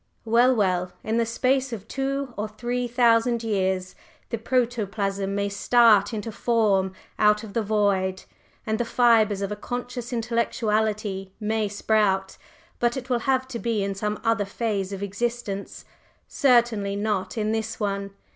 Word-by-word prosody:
Well, 240 +3 +4
well! 185 -4 0
in 220 +1 -1
the 230 -1 +1
space 260 +3 +1
of 210 -4 -6
two 270 -1 -2
or 210 +1 -3
three 245 +3 -3
thousand 235 -1 +3
years, 190 -4 -1 0.4
the 230 - -2
protoplasm 205 -5 -1
may 200 0 0
start 210 0 +4
into 220 0 -4
form 205 -5 +1 0.3
out 210 +1 +4
of 210 -2 -9
the 230 - +1
void, 200 -3 0 0.4
and 220 0 -1
the - - +2
fibres 225 -4 +3
of 200 - -3
a - - -2
conscious 245 +3 -5
Intellectuality 215 -4 -1
may 215 0 0
sprout, 205 -2 +1 0.4
but 240 +1 +1
it 255 0 -6
will 245 - +2
have 260 -1 +2
to 240 -3 -5
be 225 -4 -1
in 195 0 -2
some 210 +2 -3
other 225 -2 +2
phase 200 -1 -2
of 195 0 -5
existence 200 0 -4 0.4
certainly 235 -6 +2
not 205 -1 -2
in 215 0 0
this 225 0 -3
one. 200 -1 -2
220 Hz, 155 wpm, -25 LUFS, 200-235 Hz, 0.4 s, Well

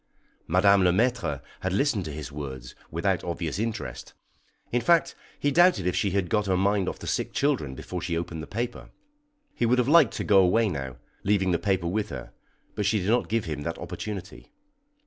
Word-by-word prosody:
Madame 95 +3 +5
Le 90 - +5
Maître 105 - 0 0.2
had 95 0 -2
listened 110 -2 +1
to 80 - -5
his 75 0 -7
words 65 -4 -7 0.2
without 90 +3 0
obvious 85 0 -3
interest; 115 0 -4 0.6
in 120 - +1
fact, 170 +6 +3 0.3
he 145 - +1
doubted 175 - +4
if 90 -1 0
she 100 +2 +1
had 95 -1 0
got 105 +3 0
her 95 -1 +2
mind 100 0 +2
off - - -6
the - - -10
sick - - -1
children 130 - 0
before 90 +6 -6
she 85 -1 -2
opened 85 -1 -4
the - - -8
paper. 120 +3 -4 0.6
He 120 - 0
would 125 +2 +3
have 125 -1 +2
liked 150 -5 +6
to - - -2
go 100 -2 +5
away 105 +4 +4
now, 65 -7 -5 0.3
leaving 95 -2 +2
the 85 - +1
paper 95 -3 0
with 105 +5 -1
her, 65 -3 -7 0.4
but 105 - -1
she 105 +1 +2
did 95 +2 -2
not 120 - +1
give 115 -1 0
him 75 -3 -4
that 85 +3 -4
opportunity. 105 -2 -7
95 Hz, 205 wpm, -26 LUFS, 85-110 Hz, 0.6 s, liked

